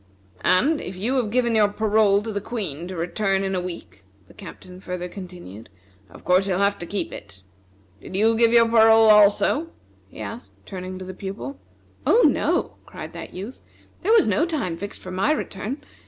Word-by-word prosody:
And 290 - +3
if 185 - -7
you 215 +8 -2
have 240 -5 0
given 240 +1 +1
your 215 -2 +4
parole 210 -1 +2
to 225 - -4
the 205 - -2
Queen 180 - -5
to 185 - -7
return 195 +3 -1
in 195 0 -2
a 185 - -1
week," 170 - -8 0.2
the - - -18
Captain 185 0 -12
further 180 -1 -5
continued, 175 - -10 0.4
"of - - -15
course 185 +2 +3
you'll 185 -2 0
have 200 +1 +1
to 175 - -6
keep 200 - -3
it. 95 -2 -11 0.6
Did - - -9
you 220 +3 +3
give 230 0 +4
your 235 -1 +6
parole 225 -1 +6
also?" 210 +9 +4 0.4
he - - -14
asked, 235 +2 -8
turning 185 -1 -7
to 185 - -8
the 185 - -7
Pupil. 195 +9 -7 0.4
"Oh, 480 - +4
no!" - - 0
cried - - -9
that - - -9
youth; 205 +8 -7 0.4
"there 405 - +1
was 460 - +5
no - - +2
time 280 - -2
fixed 200 +4 -8
for 185 - -8
my 190 +10 +1
return. 255 -2 -4
200 Hz, 190 wpm, -23 LUFS, 185-225 Hz, 0.6 s, your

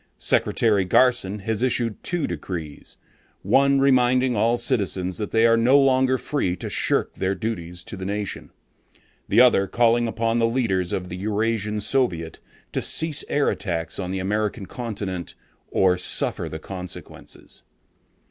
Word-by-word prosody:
Secretary 105 -4 +1
Garson 105 0 +2
has 110 +2 -2
issued 120 -3 0
two 175 -5 -1
decrees, 80 -6 -6 0.5
one 140 0 +3
reminding 130 -2 +3
all 115 +3 +2
citizens 100 -7 -1
that 105 - -3
they 115 0 +3
are 115 0 +5
no 125 +5 +4
longer 130 -1 +3
free 125 -11 -2
to - - -6
shirk - - 0
their 95 +1 -1
duties 90 -5 -5
to - - -7
the 95 - -7
nation, 100 +1 -4 0.8
the - - +4
other 120 -6 +5
calling 120 +3 +2
upon 115 +1 0
the 115 - +3
leaders 105 -8 0
of 90 -1 -3
the 90 - -6
Eurasian 105 +1 -1
Soviet 95 - -1 0.3
to - - -2
cease 160 -2 +1
air 145 0 +1
attacks 85 -4 -3
on 90 -2 -3
the 95 - -3
American 105 +2 -2
continent 100 -7 -5 0.3
or 90 -1 +2
suffer - - 0
the 80 - -6
consequences. 90 +2 -9
110 Hz, 150 wpm, -23 LUFS, 95-120 Hz, 0.8 s, are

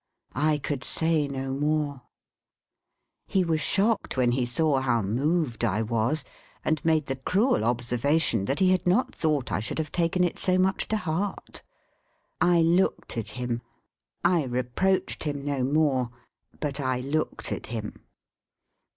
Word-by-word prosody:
I 150 +2 +2
could 140 -2 -3
say 160 -2 +1
no 135 -1 -4
more. 145 -1 -1 1.3
He 190 - +2
was 160 -2 0
shocked 205 - +1
when 125 -2 +3
he 125 0 0
saw 140 +2 +2
how 120 -4 +1
moved 130 - 0
I 110 -1 +1
was, 115 +6 0 0.4
and 155 -3 0
made 160 -2 +2
the 135 -1 -3
cruel 195 - +1
observation, 120 0 +1
that 135 - -1
he 185 -1 +4
had 185 -1 +1
not 200 +9 +2
thought 150 -5 0
I 85 - +1
should 110 - -4
have 155 -2 -3
taken 175 +1 +1
it 175 - -1
so 185 -1 +2
much 190 +1 +1
to 220 - 0
heart. 185 +1 -3 0.8
I 175 -1 +5
looked 175 -2 +1
at 110 -2 -3
him. 120 -1 -2 0.6
I 175 -4 +3
reproached 130 +10 0
him 145 -2 -3
no 140 -3 -1
more. 135 -3 +2 0.5
But 145 -1 -2
I 130 -2 0
looked 150 +4 -2
at - - -4
him. 110 -2 -6
145 Hz, 150 wpm, -26 LUFS, 125-165 Hz, 1.3 s, I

